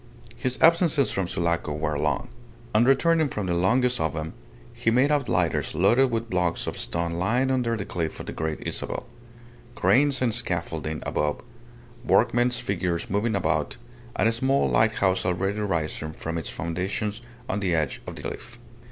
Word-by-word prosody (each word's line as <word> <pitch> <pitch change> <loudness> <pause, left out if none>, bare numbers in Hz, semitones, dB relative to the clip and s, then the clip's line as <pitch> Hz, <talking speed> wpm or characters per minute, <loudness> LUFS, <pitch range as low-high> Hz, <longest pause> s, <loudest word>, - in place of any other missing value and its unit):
His 130 +1 -1
absences 165 - +4
from 95 -2 -1
Sulaco 85 -4 -1
were 75 0 -2
long. 75 -2 -1 0.4
On 110 +3 +5
returning 155 +3 +3
from 105 -5 -3
the 90 - 0
longest 125 +8 +2
of 80 -1 -1
them, 80 +1 -4 0.4
he 120 -1 0
made 130 +5 +3
out 145 -3 +1
lighters - - 0
loaded 130 +2 +4
with 115 -1 -2
blocks 90 -4 0
of - - -3
stone 85 0 -1
lying 120 +10 +1
under 120 -3 +1
the 100 - -4
cliff 85 -5 -3
of - - -6
the - - -5
Great 80 -1 -4
Isabel; - - -4 0.7
cranes 135 +4 +3
and 120 -3 +1
scaffolding 80 -7 -3
above; 75 -1 -1 0.6
workmen's 120 +1 +3
figures 90 -3 -2
moving 105 +2 +1
about, 80 -3 0 0.4
and - - +2
a 115 - +2
small 130 +4 +2
lighthouse 100 -4 +2
already 95 +3 -1
rising 80 -5 -2
from 85 +1 -4
its 80 - -6
foundations 95 +6 -3 0.3
on 100 - -1
the 90 -4 +1
edge 75 -4 -1
of - - -6
the - - -9
cliff. - - -7
100 Hz, 170 wpm, -25 LUFS, 85-125 Hz, 0.7 s, On